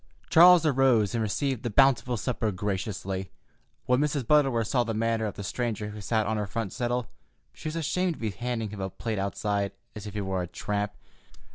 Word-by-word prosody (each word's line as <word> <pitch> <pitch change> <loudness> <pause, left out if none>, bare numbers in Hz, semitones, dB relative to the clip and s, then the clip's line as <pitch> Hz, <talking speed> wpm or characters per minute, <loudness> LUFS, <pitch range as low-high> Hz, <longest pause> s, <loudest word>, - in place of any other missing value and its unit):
Charles 175 0 +8
arose 130 -8 +3
and 115 - 0
received 120 +4 -1
the 120 - -2
bountiful 125 0 +3
supper 115 -1 -1
graciously. 95 -1 -3 0.6
When 125 0 +3
Mrs. 145 -3 0
Butterworth 135 -5 +3
saw 125 -1 +2
the 115 -2 -3
manner 115 0 0
of 105 - -6
the 100 - -6
stranger 110 0 -3
who 105 0 -8
sat 110 +2 0
on 110 +1 -1
her 105 -1 -2
front 105 0 -3
settle 120 -1 -2 0.4
she 70 - -8
was 155 - -4
ashamed 170 +2 0
to - - -16
be 110 -2 -2
handing 115 0 -3
him 105 -2 -6
a 95 - -2
plate 105 +3 -4
outside, 100 0 -1 0.2
as 105 0 -7
if 105 - -8
he 105 - -1
were 95 -1 -1
a 90 - -4
tramp. 105 +3 -3
110 Hz, 205 wpm, -27 LUFS, 100-125 Hz, 0.6 s, Charles